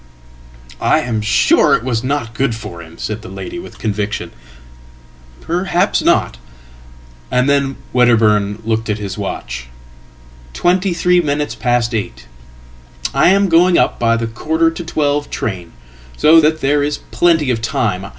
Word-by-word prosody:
""I - - +2
am 115 -3 -2
sure 60 -12 +3
it - - -3
was 120 -2 -2
not 130 -4 -2
good 125 -1 -1
for 85 -6 -8
him," 80 0 -13
said 110 0 -4
the 115 - -10
lady 345 0 -7
with - - -11
conviction."Perhaps 60 - -4
not." - - +1 0.9
And 125 +1 +1
then 140 -1 +1 0.2
Wedderburn 110 -4 +2
looked 110 0 -1
at 105 - 0
his 100 -2 -5
watch. 60 +1 -5 0.9
"Twenty 180 - +1
threeminutes 165 -5 +1
past 120 -2 0
eight. 95 - -4 0.9
I - - +4
am 200 +1 +3
going 175 +1 +4
up - - +1
by 115 -1 +2
the 115 - -2
quarter 160 +8 0
to 170 +1 -7
twelve 145 -2 -1
train, 90 -6 -4 0.5
so 160 +2 +6
thatthere 150 -2 +1
is 145 +1 -1
plenty 165 -6 +2
of 115 -2 -2
time. 105 -4 -1
120 Hz, 140 wpm, -16 LUFS, 105-155 Hz, 0.9 s, so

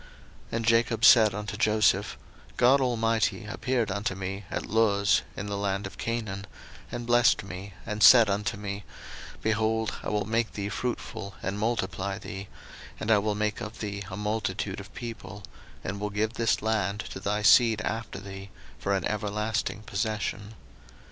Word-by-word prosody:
01:048:003 - - -19 0.5
And 115 0 -1
Jacob 115 0 +3
said 110 -4 +7
unto 105 0 -4
Joseph, 110 -1 +2 0.4
God 135 +3 +5
Almighty 115 -5 +1
appeared 115 +1 -1
unto 100 0 -2
me 95 +1 -5
at - - -3
Luz 100 -2 +3 0.2
in 100 - -4
the 100 0 -3
land 100 0 -1
of 100 - -9
Canaan, 105 -4 -3 0.4
and 120 - -4
blessed 120 -1 +4
me, 95 0 -8
01:048:004 115 - -5
And 105 0 -3
said 120 -1 +9
unto 100 0 -1
me, 100 0 -5 0.6
Behold, 110 0 +1
I - - -4
will 105 -2 0
make 115 +2 0
thee 100 -1 -3
fruitful, 100 -3 -4
and 100 +2 -2
multiply 100 -4 -1
thee, 100 -2 -7 0.5
and 110 - -1
I 105 - +6
will 105 0 -1
make 105 +1 -1
of 110 0 -6
thee 100 -2 -4
a 95 - -6
multitude 105 -2 -2
of 100 +1 -10
people; 105 -4 -7 0.4
and 100 +2 -4
will 105 0 -2
give 105 +2 -1
this 115 -3 +1
land 105 -2 0
to - - -6
thy 105 +2 -1
seed 115 0 +6
after 110 0 -4
thee 95 0 -9 0.3
for 100 0 0
an 95 - -1
everlasting 105 +1 -2
possession. 105 0 -3
105 Hz, 170 wpm, -28 LUFS, 100-110 Hz, 0.6 s, said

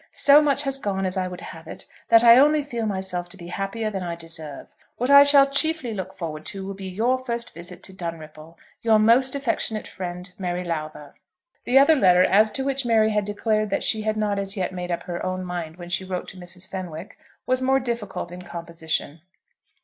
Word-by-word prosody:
So 285 +1 +6
much 285 -1 +2
has 275 -1 -2
gone 195 -4 -2
as 185 +1 -2
I 185 -1 -1
would 180 -1 -8
have 165 0 -10
it - - -8 0.2
that 230 0 +7
I 235 +1 +9
only 300 +1 +4
feel 235 -6 -3
myself 190 -3 -3
to - - -11
be 175 0 -10
happier 195 +4 -3
than 195 -2 -4
I 170 -1 -4
deserve. 160 -4 -8 0.2
What 250 +3 0
I 280 0 +10
shall 285 -1 +6
chiefly 280 -3 0
look 190 -1 -6
forward 155 -3 -6
to 195 -1 -6
will 195 - -5
be 195 0 -8
your 235 +7 +1
first 235 -1 -4
visit 175 +1 -9
to 190 - -8
Dunripple. 165 -2 -8 0.3
Your 225 -1 +4
most 240 +5 +4
affectionate 235 -5 -1
friend, 180 0 -7
MARY 180 -1 -2
LOWTHER. 155 -3 -5 0.5
The 250 - +3
other 280 +4 +7
letter, 180 -8 +5
as 215 +3 +4
to 265 - -1
which 275 0 -1
Mary 220 -2 +3
had 210 -1 0
declared 215 +1 0
that 195 - -1
she 220 - 0
had 215 0 -1
not 205 -2 0
as 195 +1 -3
yet 185 -1 -1
made 180 -1 -5
up 170 - -2
her 175 -1 -5
own 185 0 -3
mind 175 -3 -5
when 175 -1 -9
she 190 - -1
wrote 185 -1 -4
to 190 - -12
Mrs. 180 +1 -8
Fenwick, 180 -2 -7 0.3
was 255 0 +1
more 265 +1 +3
difficult 220 -8 -4
in 180 +1 -8
composition. 165 -3 -5
195 Hz, 215 wpm, -24 LUFS, 175-235 Hz, 0.5 s, I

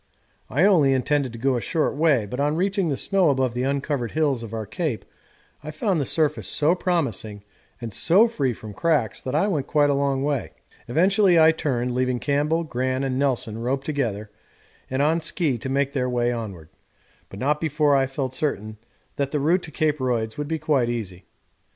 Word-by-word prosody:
I 145 +9 +1
only 165 -9 +5
intended 135 0 0
to - - -7
go 130 +2 +1
a 120 - -1
short 160 0 -1
way, 145 -7 +3
but 125 +6 -6
on 145 +2 +1
reaching 190 0 0
the 140 - -1
snow 195 -4 +2
above 130 -3 +1
the 125 - -2
uncovered 135 -2 -2
hills 145 -6 +1
of 115 -2 -8
our 110 -1 -4
Cape 125 - -3 0.6
I 155 - -6
found 160 +2 -1
the - - -1
surface 150 +1 0
so 155 +3 +2
promising 115 - -2 0.4
and 115 -3 -6
so 195 - +4
free 140 - -1
from 110 -2 -9
cracks 145 - 0
that 130 +2 -4
I 155 - +3
went 150 -9 -1
quite 145 -1 +3
a - - +2
long 140 -1 0
way. 145 -2 -2 0.3
Eventually 185 - +4
I 160 0 +7
turned, 125 -6 -2
leaving 125 0 0
Campbell, 150 +5 0
Gran, 130 -2 -2
and 130 -1 -1
Nelson 120 -5 0
roped 135 +4 -2
together 110 -8 -2 0.6
and 130 +2 0
on 160 +3 +2
ski 155 -6 0
to 130 - -5
make 140 +1 0
their 125 -3 0
way 120 -1 +1
onward, 100 -10 -6 0.6
but 95 - -10
not 150 +4 0
before 150 -2 +2
I 135 -1 +2
felt 135 -1 -4
certain 110 -8 -3 0.4
that 140 -1 0
the 150 - -1
route 170 +6 +2
to 160 - -9
Cape 155 -1 0
Royds 115 -4 -1
would 150 0 -4
be 160 +1 -1
quite 135 -6 +1
easy. 95 -6 -5
140 Hz, 200 wpm, -23 LUFS, 120-155 Hz, 0.6 s, I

